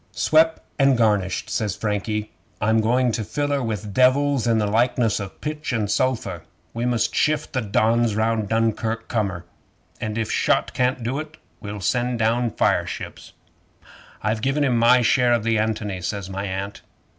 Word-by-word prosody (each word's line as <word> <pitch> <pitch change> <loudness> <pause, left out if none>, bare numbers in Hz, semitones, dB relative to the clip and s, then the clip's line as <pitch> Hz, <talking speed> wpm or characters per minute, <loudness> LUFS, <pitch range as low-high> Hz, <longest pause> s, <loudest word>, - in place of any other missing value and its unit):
'"Swep' 160 +1 +3 0.2
an' 135 -1 +5
garnished," 105 -5 +1
says 105 -3 -2
Frankie. 105 0 -2 0.3
"I'm 110 +1 +2
going 125 +3 +2
to 110 0 -2
fill 145 +7 -2
her 140 -1 0
with 105 -3 -4
devils 130 +1 +3
in 115 -1 +3
the 105 - +1
likeness 115 +1 +1
o' 100 -2 -5
pitch 150 +7 -5
and 110 -4 -1
sulphur. 115 - -1 0.3
We 120 +1 -2
must 120 -2 0
shift 155 0 0
the 130 - 0
Dons 110 +1 +1
round 110 -1 0
Dunkirk 115 0 -1
corner, 95 -6 -2 0.5
and 110 0 -3
if 110 -1 -2
shot - - +1
can't 125 -1 0
do 130 +5 -2
it, 155 0 -8 0.2
we'll 105 -1 -7
send 125 +4 0
down 115 +2 +1
fireships." - - -2 0.9
'"I've 110 +2 0
given 135 +4 +1
him 130 -4 +2
my 120 +2 +5
share 120 +2 +3
of 115 -2 +1
the 115 -1 +1
ANTONY," 105 -3 -2
says 95 +2 -4
my 100 +1 -3
Aunt. 95 +1 -5
115 Hz, 170 wpm, -23 LUFS, 105-125 Hz, 0.9 s, an